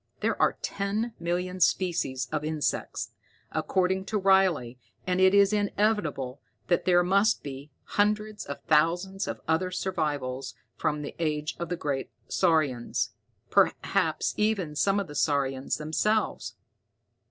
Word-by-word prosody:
There - - 0
are - - +3
ten 205 +4 -2
million 180 +2 -2
species 170 -9 +1
of 150 - -1
insects, 155 -1 -2 0.4
according 190 0 0
to 215 - -1
Riley, 190 - +3 0.3
and 185 0 +1
it 190 +1 +6
is 200 +1 +5
inevitable 200 - 0 0.3
that 175 - +2
there 175 -1 +5
must 200 +4 +3
be 140 +1 -7
hundreds 210 0 0
of 140 - -6
thousands 175 +6 +2
of - - -5
other 165 +3 +1
survivals 145 -8 -2 0.2
from 150 -1 -1
the - - -6
age 150 -2 -1
of 170 -1 -4
the 175 - -1
great 140 -4 -2 0.2
saurians, 155 -9 +1 0.4
perhaps - - +2
even 200 -8 0
some 195 +6 +2
of 200 - -2
the 145 - -10
saurians 135 -2 0
themselves. 210 +8 0
175 Hz, 130 wpm, -28 LUFS, 150-195 Hz, 0.4 s, it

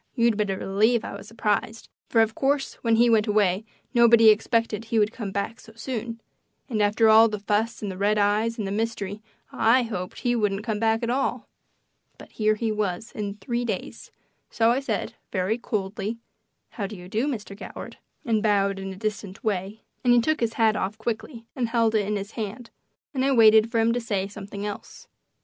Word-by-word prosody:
You'd 235 -3 +3
better 205 -2 -1
believe 215 +5 +1
I - - -6
was 200 0 -10
surprised, 220 0 -2 0.2
for, 225 - +4
of 220 0 +1
course, 275 +3 0
when 230 -1 +2
he 235 +2 +5
went 225 -2 +3
away 205 -1 +2 0.3
nobody 235 -2 +7
expected 225 0 +1
he 225 0 -1
would 210 0 +3
come 215 -5 -6
back 200 +3 -3
so 225 - -15
soon; 230 -1 -5 0.5
and 225 -6 -1
after 210 +2 +3
all 220 +1 +7
the 210 - -3
fuss 210 +3 -1
and 200 - -2
the 185 - -8
red 210 +1 +2
eyes 210 +3 +1
and 215 - -3
the 195 - -3
mystery 210 -1 -3 0.3
I 245 +3 +3
hoped 185 -6 -5
he 245 -1 +1
wouldn't 210 -3 0
come 215 -2 -2
back 225 +1 +1
at 235 - 0
all. 270 +2 -1 0.7
But - - -14
here 215 -1 +1
he 225 0 -1
was 210 0 -2
in 205 -1 -4
three 235 +4 -3
days, 235 - -5 0.4
so 225 0 +3
I 250 - +2
said, 230 -7 -3 0.2
very 190 +5 0
coldly, 210 0 -3 0.5
"How 200 -3 -4
do 210 - -8
you 180 -1 -11
do, 220 +8 -1
Mr. 215 -7 -4
Goward," 205 - -9 0.3
and 225 -3 +1
bowed 200 -2 +1
in 195 0 -5
a - - -7
distant 205 -1 -5
way; 205 0 -3 0.2
and 245 - +4
he 240 - +6
took 310 +6 +1
his 230 -1 0
hat 220 -2 +3
off 200 +3 -2
quickly 225 +2 -5
and 245 -4 -1
held 230 -1 +2
it 210 -3 +1
in 210 - -1
his 200 +1 -5
hand, 225 +2 -6 0.4
and 260 -2 0
I 275 0 +3
waited 220 -2 +6
for 230 - -1
him 225 +1 +3
to 245 - -1
say 200 -4 -2
something 200 0 -7
else. 205 -1 -8
220 Hz, 205 wpm, -25 LUFS, 205-230 Hz, 0.7 s, nobody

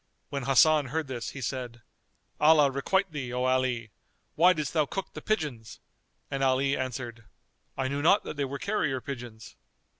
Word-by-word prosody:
When 140 -3 -4
Hasan 145 +2 +5
heard 160 +5 -2
this 125 -4 -5
he 140 - -8
said, 120 -2 -5 0.6
"Allah 150 -2 +6
requite 190 +8 0
thee, 135 -5 -5
O 125 +1 -1
Ali! 130 -4 0 0.4
Why 175 +4 +6
didst 155 -5 -2
thou 155 -3 +2
cook 195 +5 -5
the - - -7
pigeons?"; 145 - -3 0.5
and 135 - -2
Ali 135 +1 +2
answered, 120 -3 -5 0.5
"I 135 -1 0
knew 140 +2 -2
not 195 +7 +4
that - - -6
they 140 -1 -1
were 140 +1 -5
carrier 155 -8 -1
pigeons." 120 -6 -8
135 Hz, 170 wpm, -28 LUFS, 125-150 Hz, 0.6 s, Allah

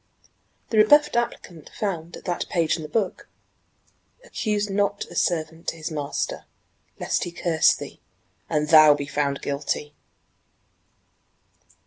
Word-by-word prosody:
The 220 - +3
rebuffed 295 +7 +5
applicant 185 -9 -3
found 175 -5 -4
at - - -15
that 175 -2 -3
page 165 -3 +1
in 165 - -6
the 155 - -7
book: 205 -2 -2 0.9
"Accuse 210 - -2
not 200 0 -1
a - - -10
servant 160 -1 -1
to - - -1
his 160 0 -6
master, 145 -2 -3 0.5
lest - - -1
he 175 - -5
curse 170 -1 +3
thee, - - -10 0.5
and 150 -1 0
thou 155 -2 +8
be 145 -1 -4
found 140 -1 -2
guilty!" 145 +1 -3
165 Hz, 130 wpm, -24 LUFS, 150-200 Hz, 0.9 s, thou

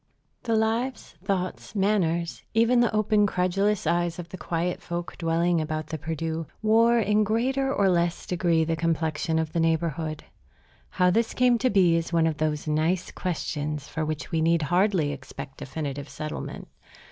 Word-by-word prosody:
The 230 -2 0
lives, 225 +3 -1
thoughts, 185 +1 -3
manners, 175 -5 +1
even 230 +2 +4
the 240 -2 +3
open, 215 -1 +3
credulous 195 +3 0
eyes 175 -1 +1
of 175 -1 -7
the - - -7
quiet 175 +1 -2
folk 175 0 -5
dwelling 170 0 +1
about 155 0 -3
the 155 0 -5
Perdu, 160 +1 -3 0.2
wore 230 +2 +5
in 210 -1 +3
greater 260 +6 0
or 200 -6 +2
less 175 -1 +1
degree 170 -2 +1
the 165 +1 0
complexion 160 0 0
of 160 -1 -1
the 170 - 0
neighborhood. 160 -1 -1 0.7
How 180 0 +2
this 225 +4 +1
came 245 -2 +4
to 255 - +2
be 185 -5 +4
is 165 0 -1
one 165 -1 +3
of 160 -2 0
those 155 0 -1
nice 160 +4 0
questions 150 -4 -3
for 160 - -3
which 155 0 -4
we 160 - +1
need 165 0 +3
hardly 175 -1 +2
expect 135 0 -9
definitive 140 0 -5
settlement. 155 0 -6
170 Hz, 165 wpm, -26 LUFS, 160-205 Hz, 0.7 s, wore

